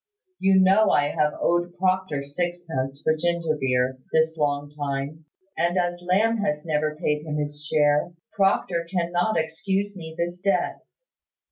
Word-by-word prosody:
You 190 0 +4
know 195 +3 +5
I 145 0 +3
have 150 0 0
owed 175 +1 +1
Proctor 185 -6 0
sixpence 145 -3 -3
for 155 - +3
ginger 170 -1 0
beer, 130 -2 0
this 160 0 +2
long 145 -1 -1
time; 145 +1 -4 0.3
and 175 +2 +1
as 175 -1 0
Lamb 205 +6 +2
has 150 -8 -1
never 155 -1 0
paid 150 -2 -1
him 155 -1 -4
his 145 0 -3
share, 150 +2 +2 0.2
Proctor 190 -4 +1
cannot 175 +2 0
excuse 195 +5 -1
me 160 -3 -8
this 175 +1 -3
debt. 190 -3 0
165 Hz, 145 wpm, -25 LUFS, 150-180 Hz, 0.3 s, know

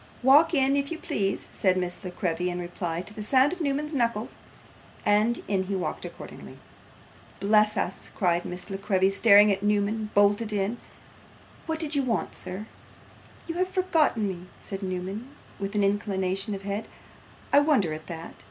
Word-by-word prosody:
'Walk 300 +6 +6
in 270 0 +3
if 280 0 0
you 335 - -3
please,' 195 -10 -2
said 185 -2 +2
Miss 180 +1 -3
La 185 - -4
Creevy 180 -1 -1
in 175 - -3
reply 175 -1 -4
to 210 - -11
the 215 - -7
sound 260 +8 +4
of 365 - -7
Newman's 300 +1 -1
knuckles; 235 -4 0 0.7
and 215 +3 +2
in 190 -2 0
he 195 +1 -2
walked 185 - -3
accordingly. - - -10 0.8
'Bless 210 +1 +3
us!' - - -3
cried 175 -3 +1
Miss 180 +2 -6
La 195 - -2
Creevy, 195 -1 +2
starting 205 0 +6
as 195 - -13
Newman 210 +1 0
bolted 205 +2 +3
in; 205 +3 -1 0.9
'what 320 -1 -2
did 310 -2 -2
you 285 - +3
want, 235 -6 -1
sir?' 190 +4 -5 0.8
'You 330 - -4
have 370 0 +1
forgotten 325 - +2
me,' 180 -1 -6
said 195 0 -5
Newman, 190 +7 -5 0.2
with 200 +1 -4
an 205 - +2
inclination 195 0 0
of 195 - -8
the - - -8
head. 205 +2 -3 0.7
'I 285 - +8
wonder 275 - +2
at 155 0 -8
that. 165 -1 -7
205 Hz, 175 wpm, -27 LUFS, 190-250 Hz, 0.9 s, I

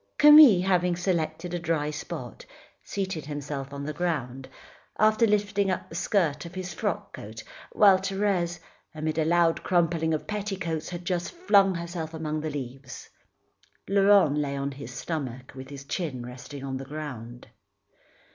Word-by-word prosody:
Camille 295 -11 +9
having 180 -2 +2
selected 175 -1 -2
a 175 - -1
dry 160 -3 -1
spot, 150 - -7 0.4
seated 190 -7 -4
himself 145 -2 -5
on 140 0 -6
the 155 - -3
ground, 135 -6 -3 0.5
after 215 +2 +4
lifting 205 -1 +1
up 185 - -2
the - - -11
skirt 165 -7 0
of 170 +2 -10
his 185 -1 -5
frock 205 -5 -3
coat; 110 +1 -9 0.3
while 195 -3 +6
Thérèse, 190 -3 0 0.4
amid 155 +1 -2
a 155 - +2
loud 170 0 +3
crumpling 170 -2 +1
of 155 - -1
petticoats, 195 -6 -3
had 175 -1 -7
just 175 -1 -2
flung 200 - +3
herself 170 -1 -5
among 155 -1 -3
the 155 - -3
leaves. 135 -2 -7 0.8
Laurent 195 -6 +5
lay 140 -1 -2
on 140 +1 -2
his 140 +1 -9
stomach 130 -6 -5
with 130 0 -9
his 140 -1 -8
chin 140 -7 -4
resting 130 +3 -9
on 135 -1 -3
the 135 - -7
ground. 130 -5 -8
165 Hz, 155 wpm, -27 LUFS, 140-190 Hz, 0.8 s, Camille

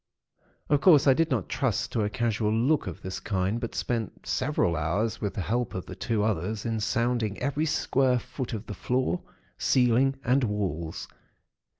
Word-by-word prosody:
Of 145 -2 +2
course, 155 -6 +6
I 135 - +7
did 165 +4 +1
not 115 -9 0
trust - - -1
to 115 - 0
a 105 - +1
casual 110 0 0
look 125 +6 +2
of 85 - -7
this 95 0 -4
kind; 95 +2 -1
but 115 - -4
spent 115 -3 -3
several 130 - +1
hours, 100 +9 -1
with 100 -3 -2
the - - -2
help 115 +6 -1
of 95 - -4
the - - -8
two 105 +3 -1
others 105 0 -1
in 115 -1 -1
sounding 115 -2 0
every 145 +4 -1
square 130 -4 +2
foot 125 +1 -5
of 110 0 -4
the - - -6
floor, 130 - -1 0.4
ceiling, 130 +1 +3
and 130 +1 +3
walls. 95 -7 -2
115 Hz, 180 wpm, -27 LUFS, 100-130 Hz, 0.4 s, I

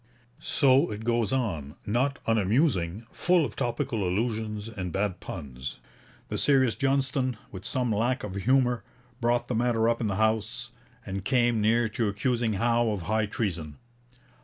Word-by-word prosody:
So 140 +2 +3
it 105 +1 -5
goes 115 -2 +1
on, 85 - -2
not 130 +6 +1
unamusing, 110 - +1
full 175 -3 +3
of - - -7
topical 120 -4 -1
allusions 105 +2 -1
and 95 -6 -5
bad 95 0 -1
puns. 65 -6 -7 0.5
The - - -2
serious 130 -5 +4
Johnston, 135 -2 0
with 95 -2 -8
some 125 -4 0
lack 120 +5 0
of 105 - -5
humour, 125 +4 +2 0.4
brought 120 0 +1
the - - -2
matter 115 -1 +2
up 115 0 +1
in 110 - +1
the 100 - -1
House, 110 +3 0 0.3
and 95 -1 -4
came 120 -1 +2
near 115 +2 +3
to 110 +1 -1
accusing 115 +2 0
Howe 115 +3 +2
of 100 -5 -2
High 110 +3 +1
Treason. 85 -9 -3
115 Hz, 155 wpm, -27 LUFS, 100-125 Hz, 0.5 s, serious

